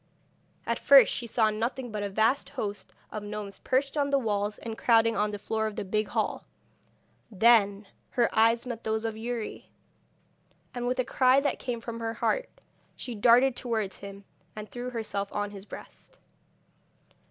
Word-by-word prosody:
At -, -, -1 dB
first 275 Hz, -1 st, +7 dB
she 240 Hz, -, -4 dB
saw 220 Hz, -1 st, +2 dB
nothing 235 Hz, +3 st, -3 dB
but 210 Hz, -1 st, -3 dB
a 205 Hz, -, -2 dB
vast 220 Hz, +7 st, +1 dB
host 205 Hz, -7 st, -5 dB, 0.2 s
of 215 Hz, -, -5 dB
gnomes 205 Hz, -1 st, -7 dB
perched 275 Hz, +2 st, 0 dB
on 285 Hz, -1 st, +1 dB
the 280 Hz, -, +3 dB
walls 210 Hz, -4 st, -1 dB
and 225 Hz, -1 st, -6 dB
crowding 230 Hz, -1 st, +3 dB
on 210 Hz, -1 st, +1 dB
the 205 Hz, -, -4 dB
floor 220 Hz, +2 st, -2 dB
of 215 Hz, -, -6 dB
the -, -, -4 dB
big 215 Hz, +2 st, 0 dB
hall. -, -, -2 dB, 0.9 s
Then 205 Hz, -1 st, +4 dB, 0.2 s
her 240 Hz, -2 st, +2 dB
eyes 230 Hz, +2 st, +4 dB
met 240 Hz, -2 st, -6 dB
those 220 Hz, 0 st, -1 dB
of 225 Hz, -1 st, -2 dB
Youri, 230 Hz, 0 st, -5 dB, 1.0 s
and 245 Hz, 0 st, -3 dB
with 250 Hz, -, 0 dB
a 255 Hz, -, +1 dB
cry 255 Hz, +1 st, +4 dB
that 285 Hz, -2 st, -1 dB
came 245 Hz, -2 st, -3 dB
from 230 Hz, 0 st, -6 dB
her 225 Hz, 0 st, -3 dB
heart -, -, 0 dB, 0.5 s
she 245 Hz, -, -6 dB
darted 240 Hz, +4 st, +5 dB
towards 220 Hz, -7 st, -2 dB
him, 200 Hz, 0 st, -10 dB, 0.3 s
and 215 Hz, 0 st, -7 dB
threw 245 Hz, +3 st, -6 dB
herself 210 Hz, -4 st, -3 dB
on 205 Hz, 0 st, -2 dB
his 200 Hz, -1 st, -10 dB
breast. -, -, -12 dB
225 Hz, 175 wpm, -28 LUFS, 210-245 Hz, 1.0 s, first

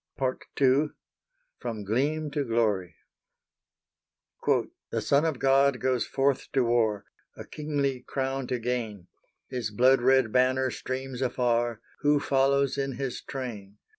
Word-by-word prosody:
*Part 130 Hz, -2 st, -2 dB
II. 140 Hz, +2 st, +4 dB, 0.7 s
FROM 110 Hz, -2 st, -5 dB
GLEAM 145 Hz, +8 st, 0 dB
TO 145 Hz, 0 st, -1 dB
GLORY.* 110 Hz, -7 st, 0 dB, 1.9 s
"The -, -, -1 dB
Son 140 Hz, +3 st, +2 dB
of 160 Hz, -5 st, 0 dB
God 135 Hz, 0 st, +3 dB
goes 130 Hz, -2 st, 0 dB
forth 135 Hz, 0 st, 0 dB
to 130 Hz, -, +3 dB
war 115 Hz, -4 st, +1 dB, 0.3 s
A -, -, -8 dB
kingly 145 Hz, -3 st, -2 dB
crown 135 Hz, -1 st, -3 dB
to 125 Hz, -, -1 dB
gain; 115 Hz, -6 st, -3 dB, 0.4 s
His 125 Hz, -4 st, -3 dB
blood 125 Hz, +5 st, +4 dB
red 130 Hz, -2 st, +4 dB
banner 130 Hz, +1 st, +2 dB
streams 130 Hz, 0 st, -5 dB
afar: 120 Hz, -2 st, 0 dB, 0.2 s
Who 145 Hz, 0 st, +3 dB
follows 140 Hz, 0 st, +2 dB
in 135 Hz, -1 st, -1 dB
His 130 Hz, 0 st, -4 dB
train? 105 Hz, -7 st, -7 dB
130 Hz, 130 wpm, -27 LUFS, 120-135 Hz, 1.9 s, II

